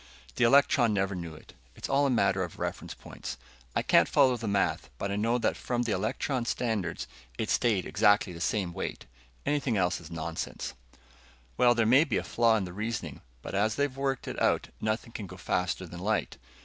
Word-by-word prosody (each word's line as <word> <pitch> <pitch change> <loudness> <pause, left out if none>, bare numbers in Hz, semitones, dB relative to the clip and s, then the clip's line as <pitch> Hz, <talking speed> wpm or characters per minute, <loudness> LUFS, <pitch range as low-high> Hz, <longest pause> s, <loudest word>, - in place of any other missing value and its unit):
"The - - +1
electron 120 -3 +5
never 100 0 0
knew 85 -3 -6
it; - - -15 0.2
it's - - -5
all 140 +1 +3
a - - +1
matter 100 -6 +2
of 85 - -7
reference - - -4
points. - - -8 0.4
I - - +1
can't - - +5
follow 130 -1 +4
the 115 -2 -5
math, 100 -10 0
but 100 - -3
I - - -1
know 115 +4 +1
that 115 - 0
from 120 -1 -1
the 115 - -1
electron's 120 +5 -1
standards 105 -9 -2 0.3
it 110 - -1
stayed 110 -6 +2
exactly 105 -3 +3
the 85 - -8
same 95 -3 0
weight. - - -5 0.4
Anything 140 -6 +1
else 90 -2 +1
is 80 - -11
nonsense." 85 0 -4 0.8
"Well, 120 - +5
there 115 -1 +2
may 130 +7 +6
be 140 -9 -1
a - - -1
flaw 115 -1 +3
in 105 - -1
the 90 - -8
reasoning, 110 +3 -4 0.2
but - - -6
as 105 +3 +1
they've 140 -2 0
worked 135 -1 -2
it - - -4
out, - - +2
nothing 110 +2 -2
can 105 -3 -6
go 90 - -10
faster 90 0 -1
than 85 0 -9
light. 105 +2 -1
110 Hz, 200 wpm, -29 LUFS, 95-120 Hz, 0.8 s, may